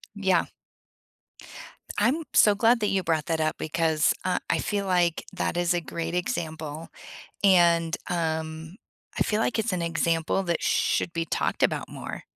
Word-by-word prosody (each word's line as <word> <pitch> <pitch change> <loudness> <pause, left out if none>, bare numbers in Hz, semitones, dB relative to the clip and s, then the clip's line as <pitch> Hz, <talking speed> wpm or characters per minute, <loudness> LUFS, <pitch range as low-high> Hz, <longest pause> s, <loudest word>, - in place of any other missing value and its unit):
Yeah. 190 -4 +2 1.5
I'm 260 +10 +2
so 210 -1 +6
glad 230 +3 +4
that 210 - +2
you 190 -2 0
brought 160 -2 0
that 160 -1 0
up 155 0 0
because, 160 -1 +1
uh, 185 - +1
I - - +2
feel 200 -2 -2
like 175 -3 +1
that 175 - -2
is 175 0 +2
a 175 - 0
great 170 +1 -5
example, 160 - -4 0.5
and, 170 -3 +4
um, 160 +1 -3 0.4
I - - -2
feel 215 +1 0
like 230 - 0
it's 220 -3 -1
an 175 - -1
example 170 +2 0
that 170 -2 -1
should - - +1
be 165 -1 -1
talked - - -2
about - - 0
more. - - -7
170 Hz, 160 wpm, -26 LUFS, 160-195 Hz, 1.5 s, so